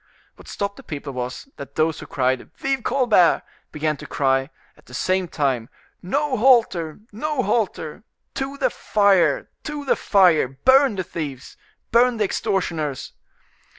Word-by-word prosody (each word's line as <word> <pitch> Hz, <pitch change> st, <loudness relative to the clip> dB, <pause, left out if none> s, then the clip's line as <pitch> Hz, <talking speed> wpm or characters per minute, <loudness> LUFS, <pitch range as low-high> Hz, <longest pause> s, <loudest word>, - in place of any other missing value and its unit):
What -, -, -16 dB
stopped 200 Hz, 0 st, -4 dB
the -, -, -12 dB
people 145 Hz, -2 st, -6 dB
was, 125 Hz, -, -5 dB
that 140 Hz, 0 st, -9 dB
those 155 Hz, 0 st, +1 dB
who -, -, -9 dB
cried 130 Hz, -1 st, -1 dB
"Vive 270 Hz, -3 st, -1 dB
Colbert!" 240 Hz, -9 st, +3 dB, 0.3 s
began 150 Hz, 0 st, -1 dB
to -, -, -10 dB
cry, 135 Hz, 0 st, +1 dB, 0.3 s
at -, -, -24 dB
the -, -, -10 dB
same 185 Hz, 0 st, 0 dB
time, 135 Hz, -7 st, -1 dB, 0.3 s
"No 275 Hz, +8 st, -1 dB
halter! 210 Hz, -, +3 dB
no 280 Hz, +5 st, -2 dB
halter! 205 Hz, -5 st, -2 dB, 0.3 s
to 270 Hz, +1 st, -4 dB
the -, -, +1 dB
fire! 205 Hz, -, +2 dB
to 295 Hz, -2 st, -5 dB
the -, -, +3 dB
fire! 180 Hz, -8 st, +4 dB
burn 260 Hz, -, +4 dB
the 185 Hz, -, -2 dB
thieves! 145 Hz, -7 st, -6 dB, 0.4 s
burn 240 Hz, +1 st, +4 dB
the 215 Hz, -, +1 dB
extortioners!" 175 Hz, -9 st, -2 dB
185 Hz, 150 wpm, -22 LUFS, 150-245 Hz, 0.4 s, fire